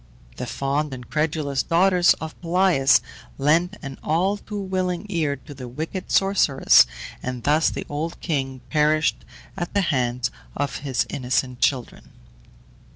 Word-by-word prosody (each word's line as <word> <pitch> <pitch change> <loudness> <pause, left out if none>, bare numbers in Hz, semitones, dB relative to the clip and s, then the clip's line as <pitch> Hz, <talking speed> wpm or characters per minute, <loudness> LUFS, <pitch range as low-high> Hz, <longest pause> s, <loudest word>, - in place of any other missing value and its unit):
The - - -4
fond 140 +1 -1
and 125 -2 -11
credulous 150 -3 0
daughters 180 +1 +4
of 160 0 -7
Pelias 175 -5 +4 0.4
lent 165 +8 +2
an 135 -1 -7
all 185 +6 +1
too 205 0 -7
willing 185 -1 -2
ear 160 -7 0
to 145 +3 -12
the 130 -2 -8
wicked 160 +9 -5
sorceress, 195 - +5 0.3
and 125 -2 -5
thus 150 +4 +3
the - - -5
old 155 +3 -4
king 135 -5 -2
perished 155 0 +2 0.3
at 175 0 -5
the 200 - +4
hands 125 -1 0 0.3
of 145 0 -2
his 130 -5 -1
innocent 125 -1 -1
children. 130 -4 -1
150 Hz, 140 wpm, -23 LUFS, 135-175 Hz, 0.4 s, sorceress